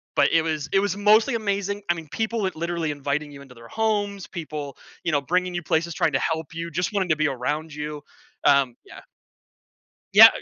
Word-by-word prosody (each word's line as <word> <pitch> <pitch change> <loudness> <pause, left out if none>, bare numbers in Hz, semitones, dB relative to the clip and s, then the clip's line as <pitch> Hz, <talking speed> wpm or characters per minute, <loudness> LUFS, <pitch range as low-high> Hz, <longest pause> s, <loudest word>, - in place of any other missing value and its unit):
but - - +4
it 165 - +5
was 155 -3 -2
it 195 - +5
was 200 -1 -1
mostly 215 +5 +4
amazing, 200 -1 -1
I - - +5
mean, 165 -2 -8
people 225 0 -1
li 190 - 0
literally 170 -1 -2
inviting 145 +1 -2
you 140 - -11
into 130 -2 -15
their 115 0 -13
homes, 205 -3 -1
people, 150 -5 -6 0.3
you 170 - 0
know, 145 - +3
bringing 180 +5 0
you 175 - -1
places, 165 +2 0
trying 155 -1 +1
to 135 - +2
help 160 -1 -1
you, 165 0 -5
just 180 +6 -1
wanting 190 -3 0
to 155 - +4
be 155 - +2
around 150 +4 -3
you. 150 0 -5 0.4
Um, 140 -4 +4
yeah. - - -12 1.1
Yeah, - - +12
165 Hz, 205 wpm, -24 LUFS, 150-195 Hz, 1.1 s, Yeah